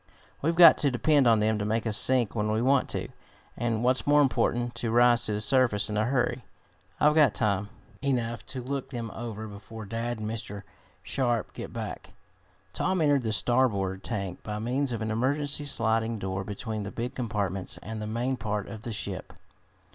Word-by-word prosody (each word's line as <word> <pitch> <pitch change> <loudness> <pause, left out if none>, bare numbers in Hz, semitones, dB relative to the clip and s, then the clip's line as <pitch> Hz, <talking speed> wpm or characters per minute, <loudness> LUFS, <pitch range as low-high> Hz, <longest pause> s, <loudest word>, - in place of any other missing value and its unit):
We've 165 +3 +1
got 170 -2 +9
to 145 - +3
depend 135 +2 +3
on 115 -2 +5
them 110 0 +1
to - - -1
make 110 +2 -1
us 110 -2 0
sink 125 -1 +2
when 105 -2 -1
we 110 - +1
want 130 +3 +2
to, - - -3 0.5
and, 115 -1 -1
what's 130 +2 +2
more 145 0 +5
important, 120 -2 0
to 115 - -2
rise 120 0 +4
to 105 - -2
the 105 - -2
surface 110 -3 +2
in - - -2
a 105 +1 +2
hurry. 125 -1 0 0.6
I've 150 0 +5
got 150 -7 +4
time 100 -2 0 0.3
enough 120 -4 -1
to 130 -1 -5
look 135 +1 -4
them 115 -4 -5
over 110 -2 -6
before 110 +2 -9
dad 115 +3 -3
and 110 -1 -4
Mr. 105 -2 -5 0.4
Sharp 120 -5 -1
get - - -7
back." - - -6 0.6
Tom 185 0 0
entered 145 -3 +3
the 110 -2 -2
starboard 100 -4 +1
tank 100 -5 -4
by 105 -1 -5
means 125 +5 -1
of 115 -2 -3
an 110 - -2
emergency 140 +5 0
sliding 115 -2 0
door 95 -1 -3
between 105 +2 -4
the 100 - -4
big 120 +4 -4
compartments 100 -6 -2
and 110 0 -6
the 105 - -4
main 120 +4 -1
part 105 -3 -3
of 110 - -8
the 120 -2 -5
ship. 100 -3 -6
115 Hz, 190 wpm, -28 LUFS, 105-130 Hz, 0.6 s, got